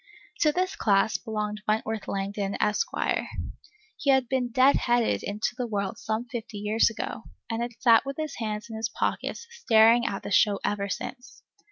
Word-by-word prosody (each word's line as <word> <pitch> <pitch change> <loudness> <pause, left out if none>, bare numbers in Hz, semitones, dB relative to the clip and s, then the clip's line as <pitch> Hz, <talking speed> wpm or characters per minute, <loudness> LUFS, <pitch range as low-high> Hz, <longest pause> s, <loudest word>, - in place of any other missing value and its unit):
To 305 - +4
this 370 +5 -1
class 205 - +2
belonged 210 -2 -4
Wentworth 220 0 -1
Langdon, 195 0 -2
Esq. 210 - +1 1.1
He 280 - -1
had 265 -2 +4
been 250 -1 0
"dead 260 +3 +5
headed" 240 -1 +1
into 210 +4 -2
the 250 -1 -3
world 200 -3 -3
some 220 +2 -2
fifty 230 -3 -6
years 210 +3 +2
ago, 225 0 -5 0.3
and 225 +1 -2
had 240 0 -5
sat 230 -2 +6
with 275 0 -5
his 310 -2 -4
hands 215 -2 -3
in 225 - -8
his 225 +1 -2
pockets 470 - -2
staring 235 - +4
at 195 - -3
the - - -6
show 200 0 +4
ever 200 -1 -1
since. 245 +6 -7
225 Hz, 175 wpm, -27 LUFS, 210-250 Hz, 1.1 s, sat